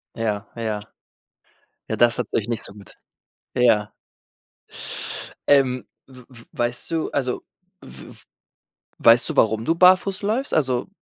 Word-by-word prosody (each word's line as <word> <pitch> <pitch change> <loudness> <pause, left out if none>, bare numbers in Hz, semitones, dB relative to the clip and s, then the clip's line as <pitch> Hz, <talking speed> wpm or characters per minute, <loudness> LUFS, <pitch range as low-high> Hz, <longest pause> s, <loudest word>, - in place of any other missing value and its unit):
Ja, 110 -2 -2
ja. 110 -3 -3 1.1
Ja, - - -2
das 120 0 +3
hat 120 - -1
euch 110 - 0
nicht 115 -2 -2
so - - -5
gut. 100 -2 -14 0.6
Ja. 110 -4 +3 1.6
Ähm, 130 -3 +3 0.2
w-w-weißt 120 -1 -6
du 165 -1 -1
also, 130 -3 -2 0.4
w 65 +1 -12
w - - -17 0.8
weißt 115 +1 +5
du, - - -4
warum 110 0 +3
du 165 - +2
barfuß 185 +2 +4
läufst? 225 +7 -1
Also 130 -5 0
120 Hz, 125 wpm, -22 LUFS, 110-140 Hz, 1.6 s, weißt